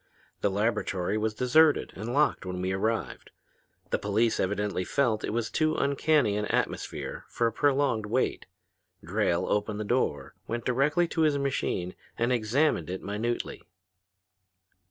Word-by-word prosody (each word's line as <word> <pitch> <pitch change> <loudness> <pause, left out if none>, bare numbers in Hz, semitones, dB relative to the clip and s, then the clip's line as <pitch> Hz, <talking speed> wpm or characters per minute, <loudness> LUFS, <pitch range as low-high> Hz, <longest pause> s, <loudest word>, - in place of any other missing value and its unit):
The 100 - +2
laboratory 100 -2 0
was 110 0 -1
deserted 145 +6 +3
and 110 +5 -5
locked 150 +4 +2
when 90 -1 -4
we 95 +1 -1
arrived. 110 +4 -2 0.6
The - - +1
police 110 +3 +1
evidently 100 -1 -1
felt 110 +1 0
it - - -2
was 115 +1 -2
too 155 0 +1
uncanny 140 -5 +2
an 105 - -1
atmosphere - - -2
for 120 - 0
a 115 - +2
prolonged 135 -4 +1
wait. 125 +5 -1 0.6
Drayle - - 0
opened 105 0 -1
the - - -1
door, 120 +5 -1
went 120 0 -3
directly 150 +7 +2
to 165 - -1
his 150 -2 +3
machine, 125 -10 -1 0.2
and 120 +2 +1
examined 120 - +1
it 95 +1 -5
minutely. 110 +4 -3
115 Hz, 145 wpm, -28 LUFS, 105-140 Hz, 0.6 s, deserted